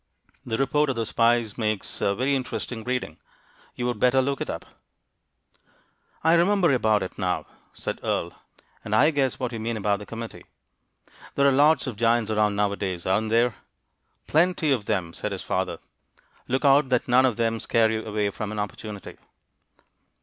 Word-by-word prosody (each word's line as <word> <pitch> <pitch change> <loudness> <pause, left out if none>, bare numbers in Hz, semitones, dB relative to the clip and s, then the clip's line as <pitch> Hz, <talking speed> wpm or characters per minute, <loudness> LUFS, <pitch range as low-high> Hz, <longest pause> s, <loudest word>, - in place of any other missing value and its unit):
The 110 -2 -2
report 140 +2 +1
of 135 - -1
the 115 -1 -1
spies 115 -1 +1
makes 110 -2 -2
very 130 +8 +1
interesting 125 -3 -4
reading; 125 -10 -3 0.6
you 120 - -3
would 120 -3 -2
better 125 +2 +4
look 140 +1 0
it - - -3
up." - - -5 1.6
"I 160 +1 +5
remember 175 -1 +4
about 110 -5 +2
it 95 - -8
now," 90 -1 -1 0.3
said - - -5
Earle, - - -2 0.5
"and 105 - -1
I 150 +8 +5
guess 135 -3 0
what 125 -2 -2
you 115 - -5
mean 115 +1 -2
about 100 -1 0
the 105 - -10
committee. 115 0 -7 0.9
There 140 0 +4
lots 145 +4 +4
of 125 -6 -5
giants 115 -1 +2
around 105 -1 +2
nowadays, 100 -3 -1
aren't 105 +4 +1
there?" 115 +1 +3 0.7
"Plenty 160 -1 +2
of 120 -7 +1
them!" 85 -3 -1
said - - -4
his - - -6
father. - - -2 0.7
"Look 130 +3 -1
out 140 0 +5
that 125 -2 +1
none 130 +1 +5
of 120 - -2
them 115 -1 0
scare 110 -1 +2
you 110 0 -2
away 105 -1 -1
from 105 +1 -5
an 110 - -5
opportunity." 105 0 -6
115 Hz, 170 wpm, -25 LUFS, 105-130 Hz, 1.6 s, I